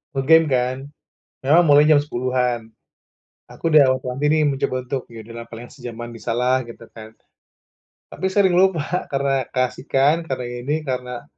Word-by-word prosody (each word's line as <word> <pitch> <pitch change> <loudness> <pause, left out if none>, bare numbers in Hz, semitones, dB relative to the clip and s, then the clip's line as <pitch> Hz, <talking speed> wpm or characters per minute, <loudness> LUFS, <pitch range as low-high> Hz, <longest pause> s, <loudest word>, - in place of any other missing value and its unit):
nge-game 160 +4 +4
kan 130 0 0 0.7
memang 160 +6 +5
mulai 145 +1 +6
jam 150 -2 +6
10.00-an. 125 -4 -2 0.8
Aku 165 - -4
udah 140 -4 +5
wanti 130 +3 -3
nih 155 0 +3
mencoba 135 -2 -1
untuk, 130 -1 -4
"Ya 115 -1 -10
udah 115 +1 -10
paling 115 +2 -11
sejaman 120 -2 -8
bisalah," 125 +2 -1
gitu 115 -1 -12
kan. 110 -1 -12 1.0
Tapi 190 - -4
sering 190 -1 +2
lupa 180 -3 +3 0.3
karena 135 -2 -1
keasikan, 135 +5 0
karena 130 -4 -4
ini, 135 +6 -3
karena 125 -1 -5
130 Hz, 140 wpm, -21 LUFS, 120-150 Hz, 1.0 s, mulai